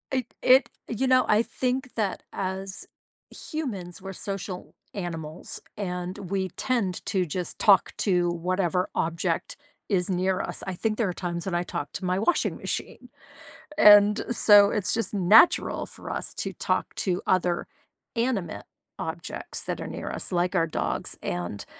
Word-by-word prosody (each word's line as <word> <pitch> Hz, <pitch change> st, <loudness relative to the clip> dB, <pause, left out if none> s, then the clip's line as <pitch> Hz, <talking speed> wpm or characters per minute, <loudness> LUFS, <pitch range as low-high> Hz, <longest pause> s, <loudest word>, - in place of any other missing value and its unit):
It 255 Hz, -3 st, -2 dB
it 260 Hz, +2 st, +6 dB, 0.2 s
you 250 Hz, +4 st, 0 dB
know, 255 Hz, 0 st, +5 dB
I 210 Hz, +1 st, +5 dB
think 255 Hz, +1 st, -2 dB
that 210 Hz, -4 st, -1 dB
as 190 Hz, +1 st, -4 dB, 0.4 s
humans, 200 Hz, -, -5 dB
we're 195 Hz, +1 st, -6 dB
social 195 Hz, -1 st, -5 dB, 0.2 s
animals, 165 Hz, -4 st, -6 dB, 0.2 s
and, 180 Hz, -2 st, -4 dB
we 190 Hz, -1 st, -1 dB
tend 220 Hz, -8 st, -1 dB
to 185 Hz, -2 st, 0 dB
just 175 Hz, +2 st, -3 dB
talk 200 Hz, -3 st, +5 dB
to 180 Hz, -3 st, +2 dB
whatever 180 Hz, +1 st, 0 dB
object 165 Hz, +1 st, -1 dB, 0.3 s
is 185 Hz, -3 st, +1 dB
near 185 Hz, 0 st, +1 dB
us. -, -, -3 dB
I 190 Hz, -, -2 dB
think 215 Hz, +4 st, -1 dB
there 225 Hz, -, +1 dB
are 180 Hz, -, -2 dB
times 170 Hz, -1 st, -4 dB
when 190 Hz, -3 st, -2 dB
I 175 Hz, -, +1 dB
talk 145 Hz, -4 st, -4 dB
to 190 Hz, -, -5 dB
my 180 Hz, +1 st, +1 dB
washing 280 Hz, -, +1 dB
machine, -, -, -5 dB, 0.7 s
and 205 Hz, 0 st, +7 dB
so, 205 Hz, -3 st, +7 dB
it's 210 Hz, -4 st, 0 dB
just 230 Hz, 0 st, 0 dB
natural 205 Hz, -, +5 dB
for -, -, -10 dB
us -, -, -2 dB
to -, -, -3 dB
talk -, -, -2 dB
to 180 Hz, -2 st, -1 dB
other 180 Hz, -2 st, +1 dB, 0.5 s
animate 230 Hz, -6 st, -1 dB, 0.4 s
objects -, -, -5 dB
that -, -, -4 dB
are -, -, -5 dB
near -, -, -5 dB
us -, -, -2 dB
like 180 Hz, 0 st, 0 dB
our 165 Hz, -, +3 dB
dogs, -, -, -2 dB
and 90 Hz, +3 st, -4 dB
190 Hz, 155 wpm, -26 LUFS, 175-215 Hz, 0.7 s, and